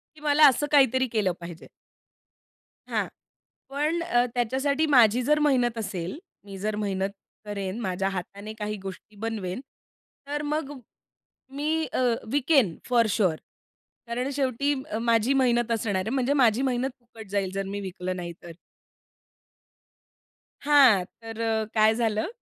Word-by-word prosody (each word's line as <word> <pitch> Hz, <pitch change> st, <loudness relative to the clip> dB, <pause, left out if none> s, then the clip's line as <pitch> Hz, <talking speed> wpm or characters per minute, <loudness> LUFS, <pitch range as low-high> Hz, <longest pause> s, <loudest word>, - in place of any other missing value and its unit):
की 300 Hz, -, -17 dB
मला 300 Hz, 0 st, +6 dB
असं 270 Hz, +3 st, 0 dB
काहीतरी 260 Hz, -2 st, +4 dB
केलं 205 Hz, -5 st, +2 dB
पाहिजे. 170 Hz, -1 st, -9 dB, 1.2 s
हां. -, -, 0 dB, 0.6 s
पण 300 Hz, +5 st, 0 dB, 0.3 s
त्याच्यासाठी 265 Hz, +5 st, +1 dB
माझी 245 Hz, -5 st, +5 dB
जर 300 Hz, +4 st, +3 dB
मेहनत 250 Hz, -6 st, +2 dB
असेल, 190 Hz, -, -4 dB, 0.3 s
मी 195 Hz, -1 st, -9 dB
जर 210 Hz, +2 st, -2 dB
मेहनत 195 Hz, -1 st, -1 dB, 0.4 s
करेन, 200 Hz, 0 st, -4 dB
माझ्या 190 Hz, -2 st, -1 dB
हाताने 200 Hz, +3 st, -6 dB
काही 210 Hz, 0 st, -3 dB
गोष्टी 195 Hz, +2 st, -9 dB
बनवेन. 210 Hz, -2 st, -4 dB, 0.7 s
तर 295 Hz, +1 st, -2 dB
मग 295 Hz, -1 st, -2 dB, 0.8 s
मी 315 Hz, +2 st, 0 dB
अ, -, -, 0 dB, 0.3 s
विकेन 275 Hz, -, +3 dB
फॉर 235 Hz, -2 st, +4 dB
शुअर 190 Hz, -6 st, +2 dB, 0.7 s
कारण 245 Hz, +3 st, -2 dB
शेवटी 280 Hz, +1 st, +1 dB, 0.2 s
अ, -, -, -1 dB
माझी 230 Hz, +2 st, +2 dB
मेहनत 240 Hz, -3 st, +2 dB
असणार 220 Hz, -3 st, -1 dB
आहे. -, -, -2 dB
म्हणजे 265 Hz, +1 st, +1 dB
माझी 245 Hz, -4 st, +3 dB
मेहनत 260 Hz, -1 st, 0 dB
फुकट 225 Hz, -3 st, -13 dB
जाईल, 195 Hz, -2 st, -1 dB
जर 195 Hz, 0 st, -2 dB
मी 200 Hz, +1 st, -4 dB
विकलं 185 Hz, -1 st, -4 dB
नाही 175 Hz, -1 st, -5 dB
तर. 170 Hz, -, -9 dB, 2.1 s
हां, 275 Hz, -10 st, +6 dB, 0.2 s
तर 225 Hz, 0 st, -7 dB, 0.3 s
काय 215 Hz, 0 st, +5 dB
झालं 220 Hz, +3 st, 0 dB
230 Hz, 135 wpm, -26 LUFS, 200-270 Hz, 2.1 s, मला